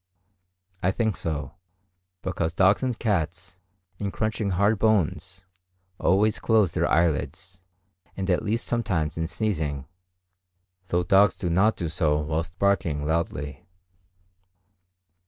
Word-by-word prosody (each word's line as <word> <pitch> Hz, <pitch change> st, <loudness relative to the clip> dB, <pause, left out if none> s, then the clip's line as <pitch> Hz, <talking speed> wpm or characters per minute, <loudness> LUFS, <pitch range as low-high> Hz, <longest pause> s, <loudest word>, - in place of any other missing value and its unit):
I 90 Hz, -, +2 dB
think 110 Hz, +2 st, 0 dB
so, 75 Hz, -4 st, -4 dB, 0.7 s
because 85 Hz, -3 st, -2 dB
dogs 95 Hz, +1 st, +4 dB
and 125 Hz, -3 st, -1 dB
cats, 90 Hz, -3 st, -2 dB, 0.4 s
in 100 Hz, -, -2 dB
crunching 110 Hz, 0 st, -2 dB
hard 100 Hz, +3 st, +2 dB
bones, 95 Hz, -3 st, 0 dB, 0.5 s
always 105 Hz, +4 st, +2 dB
close 110 Hz, -6 st, +3 dB
their -, -, 0 dB
eyelids, 85 Hz, +3 st, 0 dB, 0.6 s
and 95 Hz, -1 st, -2 dB
at 90 Hz, -2 st, +2 dB
least 110 Hz, +2 st, -1 dB
sometimes 95 Hz, -11 st, -1 dB
in 80 Hz, 0 st, -2 dB
sneezing; 80 Hz, -7 st, -2 dB, 1.0 s
though 90 Hz, 0 st, +1 dB
dogs 95 Hz, +3 st, +4 dB
do 90 Hz, -, -2 dB
not 100 Hz, +6 st, +3 dB
do 85 Hz, -, -2 dB
so 80 Hz, -2 st, +1 dB
whilst 80 Hz, +3 st, -3 dB
barking 85 Hz, -7 st, +1 dB
loudly. 75 Hz, -3 st, -3 dB
90 Hz, 120 wpm, -25 LUFS, 80-105 Hz, 1.0 s, dogs